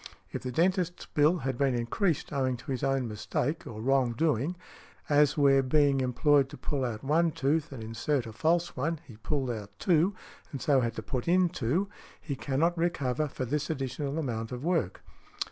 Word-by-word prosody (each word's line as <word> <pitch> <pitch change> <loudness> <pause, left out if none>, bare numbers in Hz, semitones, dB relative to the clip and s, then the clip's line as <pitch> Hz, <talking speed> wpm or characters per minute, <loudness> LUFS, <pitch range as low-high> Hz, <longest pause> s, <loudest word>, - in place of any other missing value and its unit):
If - - -4
the 130 - -4
dentist's 180 +4 +1
bill 155 +4 +3
has 130 -2 -1
been 135 -2 +2
increased 150 - -1
owing 130 -2 0
to 135 - -7
his 130 -1 -2
own 135 -2 +1
mistake 115 +8 -2
or 110 - -7
wrong 130 -2 +2
doing—as 150 +1 0
where 140 -2 +5
being 140 0 +3
employed 135 +2 +3
to 145 - -10
pull 140 -3 -2
out 115 -3 -3
one 160 +5 +3
tooth 150 +2 0
and 125 -5 -7
insert 120 +4 -1
a 110 - -8
false 170 +8 +1
one, 160 +6 -1
he 115 -6 -13
pulled 130 +3 -2
out 105 -3 -7
two, 180 +3 +2 0.4
and 140 - -5
so 135 0 +3
had 115 -1 -1
to 110 - -5
put 125 +4 -3
in 180 +1 +4
two; 155 - 0 0.3
he 140 - -4
cannot 150 +6 0
recover 155 -5 0
for 130 -2 -4
this 150 +4 -2
additional 140 0 -3
amount 115 -7 -3
of 125 +1 -5
work. 165 - 0
140 Hz, 185 wpm, -29 LUFS, 125-160 Hz, 0.4 s, where